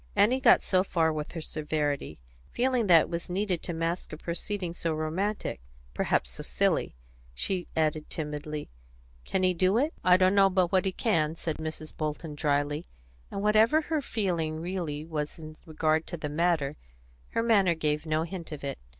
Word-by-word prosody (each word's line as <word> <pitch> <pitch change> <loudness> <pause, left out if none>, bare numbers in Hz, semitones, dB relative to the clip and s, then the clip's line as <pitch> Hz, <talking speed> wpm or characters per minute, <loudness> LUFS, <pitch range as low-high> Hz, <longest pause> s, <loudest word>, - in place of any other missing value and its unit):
Annie 210 +6 +4
got 260 -3 +6
so 185 -1 +3
far 165 -4 +1
with 150 -1 -5
her 165 - -4
severity, 150 - -2 0.3
feeling 250 -3 +1
that 170 -3 +8
it - - -4
was 170 0 -4
needed 185 -1 -1
to - - -4
mask 165 +1 -2
a 155 - -6
proceeding 175 +2 -3
so 165 -2 -2
romantic, 165 - -2 0.3
perhaps - - 0
so - - -7
silly. - - 0 0.4
She 180 - -1
added 155 -1 0
timidly, 150 - -5 0.5
"Can 190 - 0
he 185 0 +4
do 185 +4 +2
it?" 295 +6 +1
"I 180 0 +6
d'know 195 +1 +5
but 185 -2 +2
what 190 -1 +3
he 190 - +1
can," 165 -7 +1
said 160 -2 -3
Mrs. 155 0 -6
Bolton, 155 0 -3
dryly, 145 +1 0 0.4
and 200 - -4
whatever 215 +7 +5
her 315 -1 -1
feeling 175 - -1
really 165 -4 -3
was 150 -2 -4
in 155 -1 -9
regard 155 0 +1
to 175 - -5
the 150 -2 -4
matter, 155 -2 +1 0.6
her 230 - +1
manner 200 -7 +4
gave 150 0 -1
no 155 +1 +1
hint 170 -1 -7
of 150 -2 -7
it. 140 -1 -4
165 Hz, 175 wpm, -28 LUFS, 155-190 Hz, 0.6 s, that